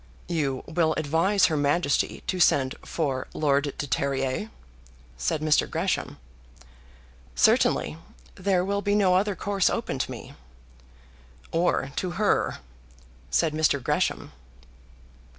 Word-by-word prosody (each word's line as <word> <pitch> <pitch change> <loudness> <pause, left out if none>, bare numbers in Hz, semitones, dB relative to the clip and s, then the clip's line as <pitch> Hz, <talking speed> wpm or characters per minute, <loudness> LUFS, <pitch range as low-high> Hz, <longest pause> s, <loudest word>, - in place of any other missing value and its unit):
"You 140 -6 -1
will 160 -1 +1
advise 165 +6 +2
her 165 -4 +1
Majesty 145 +1 0
to 185 - -2
send 135 -6 +3
for 135 -6 -2
Lord 145 -2 +2
de - - -3
Terrier," 135 -5 -1 0.7
said 60 - -1
Mr. 155 -1 +2
Gresham. - - -2 1.2
"Certainly; 75 +4 +2 0.3
there 185 -1 0
will 200 +1 -1
be 205 0 +1
no 195 -3 +4
other 195 +2 +2
course 195 +1 +1
open 230 - -3
to - - -1
me." - - -8 1.2
"Or 165 -5 +1
to 185 - -1
her," 210 0 +1 0.7
said 160 -3 +1
Mr. 155 -2 +2
Gresham. 125 - -1
155 Hz, 115 wpm, -26 LUFS, 140-185 Hz, 1.2 s, no